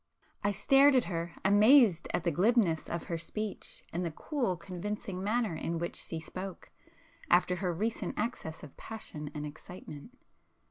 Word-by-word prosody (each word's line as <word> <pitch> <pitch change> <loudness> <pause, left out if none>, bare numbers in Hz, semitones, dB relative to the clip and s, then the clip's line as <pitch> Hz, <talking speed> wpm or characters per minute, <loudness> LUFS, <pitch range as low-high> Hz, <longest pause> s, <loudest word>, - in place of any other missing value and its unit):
I 205 - +2
stared 270 +7 +5
at 255 - +5
her, 170 -1 -3
amazed 205 - +6
at 175 - -1
the 170 - +1
glibness 185 -1 +2
of 170 - -3
her 170 -1 -3
speech, 215 +5 -5
and 175 +2 -1
the 170 - -1
cool 215 - -2
convincing 190 +2 -5
manner 215 -3 0
in 165 +1 -2
which 170 +1 -3
she 165 - -4
spoke, 185 +3 -7 0.6
after 180 +1 +4
her 180 -1 -1
recent 215 +7 -2
access 210 -8 -3
of 150 - -11
passion 155 -9 -7
and 150 0 -3
excitement. 155 - -10
185 Hz, 155 wpm, -31 LUFS, 165-215 Hz, 0.6 s, amazed